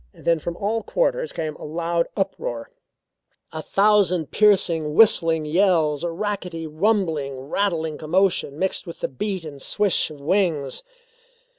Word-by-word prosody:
Then 165 Hz, -1 st, +1 dB
from 170 Hz, +2 st, -5 dB
all 220 Hz, +3 st, -1 dB
quarters -, -, -1 dB
came 155 Hz, -2 st, -4 dB
a -, -, -11 dB
loud 170 Hz, +2 st, -1 dB
uproar; 120 Hz, -, -3 dB, 0.8 s
a 160 Hz, -, -5 dB
thousand 195 Hz, -4 st, +2 dB
piercing, 170 Hz, -7 st, +2 dB
whistling 165 Hz, -7 st, +4 dB
yells; 160 Hz, -3 st, +2 dB
a 170 Hz, -, -1 dB
rackety, 180 Hz, -2 st, -4 dB
rumbling, 160 Hz, -5 st, 0 dB
rattling 160 Hz, +1 st, -2 dB
commotion 170 Hz, -3 st, +1 dB
mixed 190 Hz, +2 st, -1 dB
with 170 Hz, -, -9 dB
the -, -, 0 dB
beat 185 Hz, +6 st, -4 dB
and 140 Hz, -3 st, -9 dB
swish 205 Hz, 0 st, +1 dB
of 150 Hz, -2 st, -11 dB
wings. 155 Hz, -4 st, 0 dB
170 Hz, 135 wpm, -23 LUFS, 155-200 Hz, 0.8 s, whistling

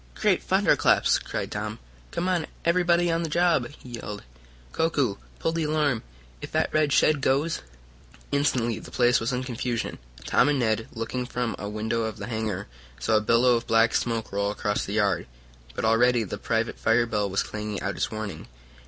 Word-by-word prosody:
"Great -, -, +2 dB
thunderclaps!" -, -, +3 dB
cried -, -, -4 dB
Tom. -, -, -4 dB, 0.3 s
"Come 175 Hz, -, -2 dB
on 180 Hz, -4 st, 0 dB, 0.2 s
everybody 175 Hz, 0 st, +3 dB
on 165 Hz, 0 st, +1 dB
the 165 Hz, -, -2 dB
job!" 170 Hz, -6 st, +2 dB, 0.2 s
he 125 Hz, -, -11 dB
yelled. 105 Hz, -1 st, -6 dB, 0.5 s
"Koku, 140 Hz, -10 st, +1 dB, 0.2 s
pull 165 Hz, -, 0 dB
the 165 Hz, -1 st, -1 dB
alarm! 150 Hz, -6 st, +1 dB, 0.4 s
If -, -, -7 dB
that -, -, +1 dB
red 155 Hz, -2 st, +2 dB
shed 150 Hz, 0 st, +4 dB
goes 140 Hz, +5 st, +1 dB, 0.3 s
" -, -, -27 dB, 0.3 s
Instantly 125 Hz, -6 st, +1 dB
the -, -, -11 dB
place 120 Hz, -1 st, +3 dB
was 115 Hz, +3 st, -1 dB
in 125 Hz, 0 st, -1 dB
confusion. 125 Hz, -2 st, -3 dB, 0.3 s
Tom -, -, +4 dB
and 145 Hz, -, +2 dB
Ned, 110 Hz, -3 st, 0 dB
looking 120 Hz, +2 st, -3 dB
from 120 Hz, -2 st, -2 dB
a 100 Hz, -, -4 dB
window 110 Hz, +2 st, -1 dB
of 110 Hz, -2 st, -3 dB
the -, -, -5 dB
hangar, 110 Hz, -4 st, -3 dB, 0.3 s
saw 85 Hz, -, +2 dB
a -, -, +2 dB
billow 115 Hz, +3 st, +4 dB
of 115 Hz, -, -3 dB
black 115 Hz, 0 st, +4 dB
smoke 115 Hz, -2 st, -1 dB
roll 100 Hz, 0 st, 0 dB
across 105 Hz, 0 st, -1 dB
the 100 Hz, -, -5 dB
yard. 100 Hz, -4 st, +1 dB, 0.5 s
But -, -, -2 dB
already 120 Hz, +1 st, +4 dB
the 100 Hz, -, -6 dB
private 115 Hz, 0 st, -1 dB
fire 120 Hz, +1 st, +3 dB
bell 105 Hz, -3 st, -1 dB
was 95 Hz, -, 0 dB
clanging 105 Hz, -2 st, -4 dB
out 100 Hz, +1 st, -2 dB
its -, -, -1 dB
warning. 110 Hz, -3 st, -6 dB
115 Hz, 190 wpm, -26 LUFS, 110-140 Hz, 0.5 s, shed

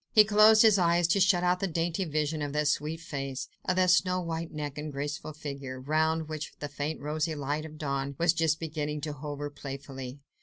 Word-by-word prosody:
He 215 Hz, -, +10 dB
closed 215 Hz, +1 st, +6 dB
his 215 Hz, -3 st, +6 dB
eyes 170 Hz, -1 st, +3 dB
to 200 Hz, -, +3 dB
shut 185 Hz, -2 st, +4 dB
out 180 Hz, 0 st, +2 dB
the 195 Hz, -, 0 dB
dainty 170 Hz, +2 st, -1 dB
vision 155 Hz, 0 st, -1 dB
of 145 Hz, -1 st, -3 dB
that 150 Hz, 0 st, +1 dB
sweet 155 Hz, +2 st, 0 dB
face, 135 Hz, -4 st, -4 dB, 0.2 s
of 185 Hz, -, +1 dB
that 185 Hz, -1 st, +4 dB
snow 185 Hz, +1 st, +3 dB
white 165 Hz, -1 st, -4 dB
neck 150 Hz, -2 st, -5 dB
and 150 Hz, 0 st, -5 dB
graceful 145 Hz, +2 st, -4 dB
figure, 140 Hz, -3 st, -6 dB
round 155 Hz, +3 st, +1 dB
which 155 Hz, -1 st, -5 dB
the 145 Hz, -, -4 dB
faint 145 Hz, +3 st, -3 dB
rosy 155 Hz, +2 st, -2 dB
light 145 Hz, +2 st, -2 dB
of 155 Hz, -1 st, -10 dB
dawn 140 Hz, -2 st, -2 dB
was 170 Hz, 0 st, +3 dB
just 160 Hz, -1 st, +1 dB
beginning 150 Hz, -2 st, -3 dB
to 150 Hz, 0 st, -3 dB
hover 145 Hz, 0 st, -5 dB
playfully. 135 Hz, -2 st, -7 dB
155 Hz, 205 wpm, -29 LUFS, 145-170 Hz, 0.2 s, He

